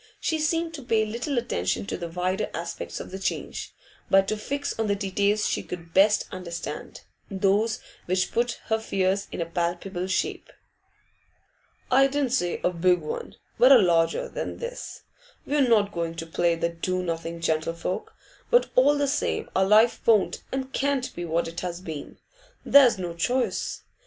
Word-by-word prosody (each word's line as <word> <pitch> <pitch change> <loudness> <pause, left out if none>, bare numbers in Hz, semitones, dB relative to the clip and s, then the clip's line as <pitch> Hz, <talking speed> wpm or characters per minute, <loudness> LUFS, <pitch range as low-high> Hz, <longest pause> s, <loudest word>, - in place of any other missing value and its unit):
She 320 -1 -1
seemed 330 +2 0
to 300 - -7
pay 225 -2 +2
little 240 +6 -3
attention 95 - -1
to - - -3
the 170 -1 -5
wider 180 +2 -1
aspects 170 0 -5
of - - -8
the 190 - -6
change, 190 - -3 0.4
but 195 0 +5
to 215 - 0
fix 280 +7 -3
on 225 - +1
the 200 - +2
details 200 +1 +1
she - - -1
could 170 -2 -8
best 205 +2 +4
understand, 175 -3 -6 0.3
those 200 +3 +1 0.3
which 185 +1 +1
put 235 +1 +1
her 220 0 +1
fears 195 -2 0
in 170 - -3
palpable 175 +2 -2
shape. 190 - -2 1.4
'I 270 +2 +6
didn't 275 -2 -1
say 180 -9 0
a 180 - +2
big 180 +1 +3
one, 155 - -6 0.2
but 255 +3 +7
a 270 - +10
larger 170 -5 +2
than - - -5
this. 485 +1 -7 0.4
We're 290 0 +1
not 210 -4 +3
going 165 -1 -3
to 165 0 -5
play 170 +1 +1
the 170 0 -1
do 185 +2 -2
nothing 165 -1 -4
gentlefolk; 165 +2 -2 0.4
but 485 0 +4
all 285 +3 +5
the 285 0 +1
same 275 - -1
our 190 - +4
life 215 +4 +5
won't 215 -4 +3
and 265 0 -4
can't 275 -2 0
be 175 - -4
what 165 +1 0
it 165 +1 -6
has 175 -1 -4
been. 160 -6 -7 0.5
There's 270 -6 +7
no 175 -2 -4
choice. 245 +10 -1
195 Hz, 170 wpm, -26 LUFS, 170-240 Hz, 1.4 s, a